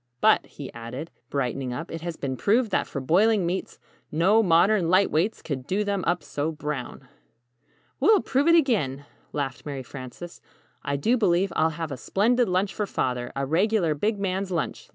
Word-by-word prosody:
But," - - +4
he - - -9
added, 120 +7 -7 0.2
brightening 130 -2 -2
up, 165 +7 -6
"it 165 - -5
has 170 -1 -5
been 130 -2 -3
proved 220 - +2
that - - +1
for 140 - -4
boiling 190 +8 +3
meats, 180 +3 -3 0.3
no 185 +8 +4
modern 180 0 +3
'light 185 +2 +4
weights' 180 +8 0
could 135 -3 -4
'do 200 +3 0
them 200 -2 -1
up 175 -3 +1
so 145 +2 -2
brown!'" 150 -4 -5 0.9
"We'll 430 -3 +5
prove 275 +4 +1
it 335 - +7
again," 175 - +1 0.3
laughed 135 -3 -3
Mary 140 -3 -5
Frances. 130 +7 -9 0.4
"I 140 -1 -2
do 225 - +2
believe 190 -3 +2
I'll 160 +1 +3
have 165 -3 -4
a 135 - -4
splendid 230 - +1
lunch 185 +2 0
for 210 - -2
Father 125 -6 -2
a 140 0 -1
regular 175 +2 +2
big 210 +9 -1
man's 195 0 -2
lunch. 170 -4 -3
170 Hz, 180 wpm, -25 LUFS, 140-205 Hz, 0.9 s, it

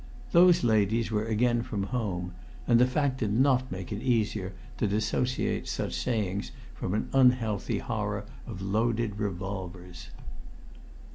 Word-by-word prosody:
Those 175 -2 +6
ladies 110 0 +2
were 105 0 0
again 120 +2 +2
from 105 -4 -3
home, 95 -6 -3 0.3
and 120 -1 +5
the 125 - +5
fact 130 0 0
did 105 -4 0
not 130 +2 +2
make 95 0 -6
it 105 0 -3
easier 110 -6 0 0.3
to 110 - +2
dissociate 110 +5 0
such - - -3
sayings 105 -5 -1 0.2
from 90 - -3
an 110 - -1
unhealthy 125 -6 +3
horror 105 -3 -3 0.2
of 95 -5 -6
loaded 110 +1 0
revolvers. 95 -3 -5
110 Hz, 135 wpm, -28 LUFS, 100-120 Hz, 0.3 s, Those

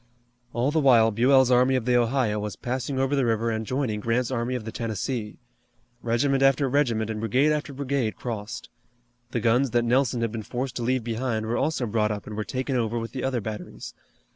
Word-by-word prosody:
All 120 +4 0
the 160 - +2
while 120 -6 +5
Buell's 130 +3 +4
army 125 +1 +4
of 125 -3 -1
the 125 0 +2
Ohio 120 -3 +1
was 105 -1 -4
passing 130 +2 -3
over 135 +2 +1
the 135 - +2
river 115 -1 +1
and 110 -1 -3
joining 125 -5 -1
Grant's 115 +3 0
army 125 0 -1
of 115 -4 -5
the 110 - -5
Tennessee. 110 0 -3 0.6
Regiment 135 +4 +1
after 135 0 +4
regiment 120 -5 +1
and 110 - -4
brigade 125 +7 +2
after 150 -1 -2
brigade 135 -4 -2
crossed. 110 -3 -6 0.6
The 120 - -2
guns 120 +4 +2
that 120 0 +1
Nelson 125 0 +2
had 115 -2 0
been 115 -1 -4
forced 125 +4 -4
to - - -3
leave 125 +1 0
behind 115 -1 -2
were 115 +2 -1
also 140 -2 0
brought 105 -1 +1
up 105 -1 -4
and 105 - -7
were 105 - -2
taken 130 +4 -3
over 115 -1 0
with 115 0 -4
the 130 - -5
other 130 -3 0
batteries. 105 0 -7
120 Hz, 210 wpm, -25 LUFS, 110-130 Hz, 0.6 s, while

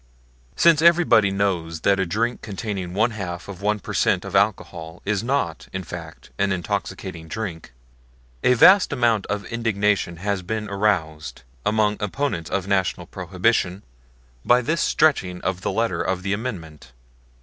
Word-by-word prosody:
Since 165 -2 +5
everybody 165 -12 +5
knows 90 -5 -1
that 100 +1 +3
a 95 - 0
drink 115 +7 -1
containing 95 -3 -5
one 110 +4 +2
half 90 -5 -6
of 100 -2 -9
one 105 +1 +1
per - - -7
cent. 90 - +1
of 100 0 -6
alcohol 90 -4 0
is 100 -1 0
not 125 - -1
in 95 0 -4
fact 80 -2 -9
an 100 0 +2
intoxicating 85 -2 -4
drink, 85 - -6 0.7
a 125 - +5
vast 190 - +7
amount 120 -6 +1
of 105 0 -3
indignation 105 -6 0
has 100 +2 -2
been 105 +3 -4
aroused, 90 - -1 0.2
among 105 -1 +1
opponents 105 - -2
of 100 -1 -2
National 95 -3 0
Prohibition, 95 +2 -1 0.6
by 125 +1 +4
this 155 +3 0
stretching 95 -13 +2
of 95 -1 -2
the - - -1
letter 115 0 0
of 95 -1 -2
the 95 0 0
Amendment. 85 - -6
100 Hz, 150 wpm, -23 LUFS, 90-110 Hz, 0.7 s, vast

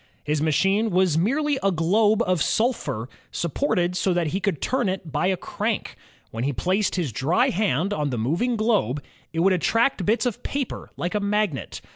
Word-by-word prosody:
His 150 0 -1
machine 195 +8 +2
was 185 -4 +2
merely 275 - +1
a 195 - +2
globe 205 +6 +3
of 185 -4 0
sulphur 220 - 0 0.2
supported 175 - 0
so 180 0 +1
that 175 -1 +1
he 190 - -1
could 190 -7 -1
turn 255 -6 0
it 185 -4 -4
by 180 - +1
a 190 -1 +1
crank. - - -3 0.4
When 115 +1 -4
he 140 +2 0
placed 185 - 0
his 170 -8 -1
dry 135 - +2
hand 195 -1 0
on 150 -6 -1
the 125 - -2
moving 170 - 0
globe, 210 - +1 0.3
it 165 - -1
would 190 +2 +4
attract 225 +4 +1
bits 220 +7 +1
of 245 -4 -2
paper 275 -3 -4
like 175 - -2
a 210 - +1
magnet. 205 -6 -1
185 Hz, 185 wpm, -24 LUFS, 160-215 Hz, 0.4 s, would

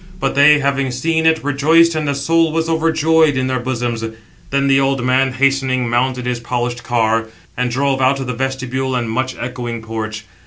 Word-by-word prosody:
But - - -1
they, 145 +2 +6
having 140 -1 0
seen 160 +6 0
it, 160 -2 +2
rejoiced, 160 +4 +3
and 155 -1 -2
the 140 - 0
soul 165 +3 +1
was 165 +1 -1
overjoyed 160 -2 +2
in 130 - 0
their 130 0 -1
bosoms. 120 -2 -3 0.5
Then 140 0 0
the 135 0 +4
old 135 -2 0
man, 130 +1 +2
hastening, 130 -1 +1
mounted 125 +1 -1
his 125 -1 -2
polished 120 0 -3
car, 115 -1 0 0.3
and 125 0 -1
drove 135 +2 0
out 130 +1 +2
of 135 - -4
the 125 - -3
vestibule 130 +1 -3
and 120 -2 -1
much 130 +3 -2
echoing 120 -2 -5
porch. 110 -1 -5
130 Hz, 190 wpm, -17 LUFS, 120-140 Hz, 0.5 s, they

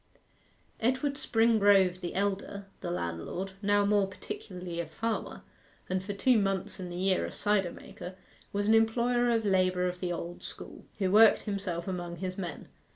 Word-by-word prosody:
Edward 260 +4 +1
Springrove 205 -8 +4
the 175 - -4
elder, 200 0 -2
the - - -4
landlord, 175 - -3
now 205 0 +3
more 205 -1 +3
particularly 180 -2 -7
a 170 - -2
farmer, 225 +7 -3 0.4
and 185 0 -1
for 205 +1 -4
two 235 +3 +3
months 195 -2 -1
in 180 -1 -5
the 175 - -6
year 185 +1 +1
a - - -4
cider 205 -4 +1
maker, 180 +1 -9 0.4
was 205 0 -1
an 220 - +5
employer 240 +2 +3
of 225 -2 +1
labour 185 -2 +2
of 180 0 -4
the 180 -1 -2
old 175 0 -5
school, - - -9
who 190 -3 0
worked 220 +2 +7
himself 195 -5 -3
among 175 -2 -4
his 185 +1 -4
men. 175 -5 -6
195 Hz, 165 wpm, -30 LUFS, 180-210 Hz, 0.4 s, worked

